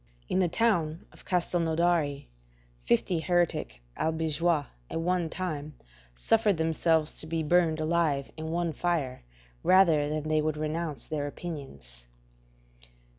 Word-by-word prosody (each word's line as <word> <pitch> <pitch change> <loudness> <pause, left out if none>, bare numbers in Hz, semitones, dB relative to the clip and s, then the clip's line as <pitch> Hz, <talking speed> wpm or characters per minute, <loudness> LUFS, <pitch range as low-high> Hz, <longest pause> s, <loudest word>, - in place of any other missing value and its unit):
In 185 - +1
the 185 - +3
town 170 -7 +1
of - - -18
Castelnaudari, 170 -4 +1 0.6
fifty 165 +8 +2
heretic 170 - 0
Albigeois 160 -1 0 0.2
at - - -3
one 175 0 0
time 155 -5 -4 0.4
suffered 210 - +2
themselves 160 -1 +2
to 155 - -6
be 165 0 -1
burned 160 0 +3
alive 155 -4 0
in 160 0 -5
one 170 0 -1
fire 150 -6 -1 0.4
rather 165 -6 +4
than 155 0 -2
they 155 0 +1
would 155 0 -1
renounce 155 -3 -3
their 145 -2 -3
opinions. 70 - -8
160 Hz, 125 wpm, -28 LUFS, 150-175 Hz, 0.6 s, rather